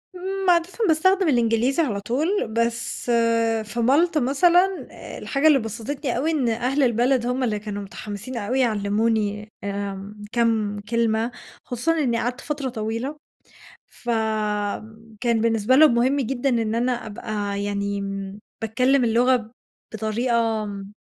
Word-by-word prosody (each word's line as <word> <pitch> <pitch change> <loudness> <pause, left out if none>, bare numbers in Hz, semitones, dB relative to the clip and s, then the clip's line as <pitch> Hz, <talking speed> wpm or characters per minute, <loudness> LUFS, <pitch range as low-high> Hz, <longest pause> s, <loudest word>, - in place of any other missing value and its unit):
إمم، 385 +1 -2
عادة 340 -1 +3 0.2
باستخدم 375 +4 +3
الإنجليزي 240 +2 +2
على 210 -9 -2
طول. 250 +9 -1 0.3
بس 230 +1 -1 0.6
في 215 +3 -6
مالطا 300 +7 +3
مثلًا، 350 +8 +3
آآ، - - -9
الحاجة 280 +2 +1
اللي 295 -3 +6
بَسَطتني 240 +4 -3
أوي 305 +6 +1
إن 275 -7 +1
أهل 250 +5 0
البلد 245 +1 +2
همّ 250 +2 -1
اللي 215 -4 0
كانوا 205 -1 -5
مُتحَمسين 205 +5 -7
أوي 235 +5 -1
يعلِّموني، 210 -2 0
آمم، 200 +1 -5
كام 220 -3 +1
كلمة. 230 0 +1 0.3
خصوصًا 250 +7 -1
إنّي 245 -6 +1
قعدت 250 +2 -2
فترة 285 -3 -3
طويلة، 230 +5 -4 0.7
فكان 220 0 -2
بالنسبة 225 +2 +2
لهم 305 -3 +7
مهم 250 +4 +2
جدًا 265 +1 -1
إن 225 -3 0
أنا 245 +2 +1
أبقى 205 -2 -4
يعني 200 0 -2 0.6
باتكلم 250 +4 +2
اللغة 235 0 +2 0.4
بطريقة 225 0 0
آمم 200 -1 -7
235 Hz, 130 wpm, -23 LUFS, 215-265 Hz, 0.7 s, لهم